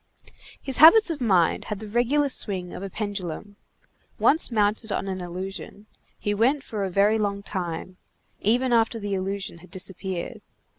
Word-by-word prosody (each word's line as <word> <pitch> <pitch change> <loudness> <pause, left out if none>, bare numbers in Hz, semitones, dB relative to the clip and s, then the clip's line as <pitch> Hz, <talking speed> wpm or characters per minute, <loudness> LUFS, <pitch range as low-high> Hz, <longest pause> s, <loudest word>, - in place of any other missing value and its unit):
His 270 -2 -2
habits 335 +6 +8
of 300 -4 -5
mind 185 -8 +2
had 210 - -4
the 215 - -8
regular 245 +7 +1
swing 185 -8 -2
of - - -7
a 195 - -5
pendulum. 205 -1 -5 0.6
Once 320 - +4
mounted 215 0 0
on 195 - -2
an 190 -1 -4
illusion, 190 +3 -7 0.3
he 205 - -2
went 260 +7 +2
for 210 -6 -4
a 195 - -1
very 205 +4 +3
long 200 -1 -2
time, 180 -2 -5 0.4
even 245 +4 +1
after 230 0 +2
the 205 -2 -4
illusion 195 -2 -3
had 180 - -16
disappeared. 185 -1 -5
205 Hz, 160 wpm, -25 LUFS, 190-230 Hz, 0.6 s, habits